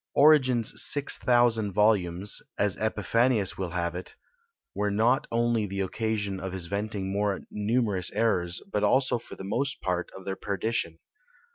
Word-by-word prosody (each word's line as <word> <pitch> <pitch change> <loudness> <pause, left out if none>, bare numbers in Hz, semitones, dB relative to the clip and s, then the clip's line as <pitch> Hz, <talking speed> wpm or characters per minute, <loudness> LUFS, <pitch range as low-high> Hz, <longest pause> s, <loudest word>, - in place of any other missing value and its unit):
Origen's 130 -6 +4
6000 120 -7 +2
volumes 100 -2 +2 0.2
(as 105 -2 +1
Epiphanius 110 +1 +1
will 95 -2 -4
have 85 0 -2
it) 90 +1 -8 0.6
were 105 0 -1
not 115 +6 +1
only 115 -2 +1
the 100 0 -3
occasion 100 0 -2
of 95 -1 -6
his 95 -3 -3
venting 100 +1 -3
more 100 -1 -1
numerous 105 -3 0
errors, 90 -6 0
but 105 - -1
also 130 +3 +2
for - - -11
the - - -9
most 135 +8 -2
part 90 -1 -2
of 95 - -12
their 95 - -3
perdition. 100 -5 -2
105 Hz, 145 wpm, -27 LUFS, 95-115 Hz, 0.6 s, Origen's